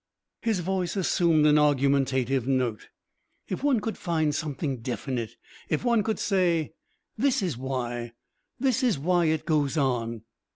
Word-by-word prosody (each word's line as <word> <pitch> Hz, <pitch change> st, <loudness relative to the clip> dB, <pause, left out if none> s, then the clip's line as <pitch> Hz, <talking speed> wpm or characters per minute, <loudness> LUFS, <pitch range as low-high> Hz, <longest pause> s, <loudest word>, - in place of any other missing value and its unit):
His 220 Hz, -6 st, 0 dB
voice 185 Hz, 0 st, -2 dB
assumed 170 Hz, -5 st, +3 dB
an 150 Hz, 0 st, +5 dB
argumentative 135 Hz, -3 st, +2 dB
note. 125 Hz, -5 st, 0 dB, 0.6 s
"If 185 Hz, -, -4 dB
one 280 Hz, -5 st, +3 dB
could 220 Hz, +1 st, -4 dB
find 160 Hz, -5 st, 0 dB
something 145 Hz, -2 st, -3 dB
definite... 120 Hz, -1 st, -4 dB, 0.3 s
If 155 Hz, +9 st, -1 dB
one 235 Hz, -2 st, +3 dB
could 220 Hz, +2 st, -1 dB
say, 175 Hz, -6 st, +1 dB, 0.5 s
'This 260 Hz, -4 st, +2 dB
is 175 Hz, -8 st, -1 dB
why 120 Hz, -2 st, -4 dB, 0.5 s
this 260 Hz, -1 st, +1 dB
is 245 Hz, -, +2 dB
why 175 Hz, +4 st, +2 dB
it 160 Hz, -1 st, 0 dB
goes 150 Hz, -2 st, +1 dB
on....'" 115 Hz, -5 st, -1 dB
150 Hz, 140 wpm, -27 LUFS, 130-185 Hz, 0.6 s, an